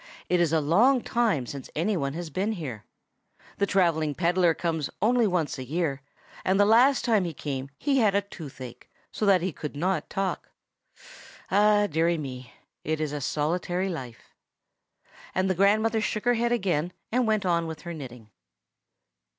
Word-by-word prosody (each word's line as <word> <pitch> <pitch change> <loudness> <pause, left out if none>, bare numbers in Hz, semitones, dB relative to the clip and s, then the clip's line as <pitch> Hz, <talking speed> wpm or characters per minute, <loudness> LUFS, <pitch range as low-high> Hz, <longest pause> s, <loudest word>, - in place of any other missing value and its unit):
It 180 - +3
is 170 -3 +2
a 160 - +3
long 225 - +3
time 220 - +1
since 135 +2 -8
any 195 +7 0
one 140 -5 -2
has 165 0 -6
been 200 +8 -1
here. 135 - -6 0.7
The 200 - +2
travelling 160 -6 +1
pedler 175 -1 +2
comes 160 -5 -2
only 235 +2 +3
once 170 -8 -1
a - - -4
year, 145 0 -2 0.4
and 190 +1 +2
the 205 - +6
last 245 +6 +4
time 220 -5 +3
he 170 -3 -4
came 135 -2 -4
he 275 - +1
had 210 -4 +3
a 200 - +3
toothache, 135 -10 -10 0.2
so 215 - -2
that 190 -3 +5
he 185 - -1
could 150 -1 -7
not 175 +1 -1
talk. 195 -1 -3 1.0
Ah, 205 +1 +4
deary 165 -1 +1
me! 130 -4 -7 0.3
it's 155 -1 -2
a 145 -1 -4
solitary 175 +6 -1
life." 125 -9 -8 1.0
And 185 +1 +1
the - - +3
grandmother 215 +4 +2
shook 215 +1 -2
her 245 - +4
head 235 0 0
again, 180 -7 0 0.2
and 245 0 +1
went 215 -2 +1
on 170 -2 +1
with 160 -1 -7
her 170 -1 -6
knitting. 125 -8 -10
175 Hz, 170 wpm, -26 LUFS, 150-205 Hz, 1.0 s, the